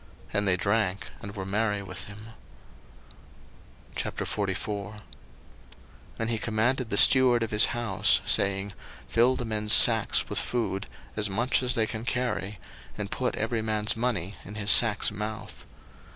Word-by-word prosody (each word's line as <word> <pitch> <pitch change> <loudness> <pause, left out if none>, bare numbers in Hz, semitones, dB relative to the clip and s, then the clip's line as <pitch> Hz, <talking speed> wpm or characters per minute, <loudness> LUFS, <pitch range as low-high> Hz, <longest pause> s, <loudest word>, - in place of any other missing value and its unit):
And 100 0 0
they 90 -1 +3
drank, 100 +1 -2
and 100 -2 -9
were 95 -2 -6
merry 105 +1 -2
with 95 0 -8
him. 105 +2 -12 1.7
01:044:001 105 +1 -4 1.2
And 115 0 -3
he 115 - -2
commanded 120 +3 -1
the 100 - -1
steward 125 -2 +6
of 115 - -5
his 105 0 +7
house, 120 -1 +2
saying, 100 0 0 0.3
Fill 120 +3 +2
the 120 - -5
men's 105 -1 0
sacks 115 -3 +6
with - - -2
food, 115 -5 -3 0.3
as 105 -1 0
much 120 +8 0
as 125 -1 +1
they 110 -3 +1
can 110 0 -7
carry, 110 -5 -3 0.4
and - - -6
put - - -2
every 110 +1 -2
man's 110 -1 -2
money 105 -6 -3
in 105 - -11
his 105 -1 +1
sack's 110 -3 +4
mouth. 105 +1 -8
110 Hz, 145 wpm, -26 LUFS, 100-115 Hz, 1.7 s, his